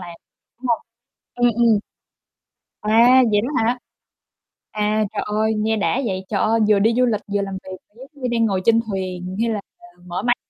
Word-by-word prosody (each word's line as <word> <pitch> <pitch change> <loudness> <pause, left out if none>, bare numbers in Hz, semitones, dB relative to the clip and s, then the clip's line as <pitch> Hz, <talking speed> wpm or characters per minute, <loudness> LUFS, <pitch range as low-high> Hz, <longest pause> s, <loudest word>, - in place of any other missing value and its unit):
làm, 175 -2 -9 0.4
đúng 255 - -7
hông? 235 - +2 0.6
Ừm, 245 0 +3
ừm. 230 -3 +4 1.0
Wow, 235 +4 +5
vậy 205 - +3
đó 245 - -3
hả? 240 +3 +1 0.9
À, 215 0 0
trời - - -2
ơi, 215 +1 0
nghe 220 +1 0
đã 225 +6 0
vậy, 190 -3 -3
trời 200 - -1
ơi, 225 +1 +2
vừa 210 -1 +5
đi 225 +3 +3
du 250 - +4
lịch 215 -3 0
vừa 205 - +1
làm 195 -1 -4
việc, 185 0 -8 0.2
kiểu - - -27 0.2
giống 285 - -18
như, 250 - +1
đang 230 -1 +2
ngồi 195 -4 0
trên 230 0 +5
thuyền 185 -1 -4
hay 230 - +1
là 210 -2 -2 0.4
mở 180 +2 -4
máy 245 +2 +2
215 Hz, 200 wpm, -21 LUFS, 200-235 Hz, 1.0 s, Wow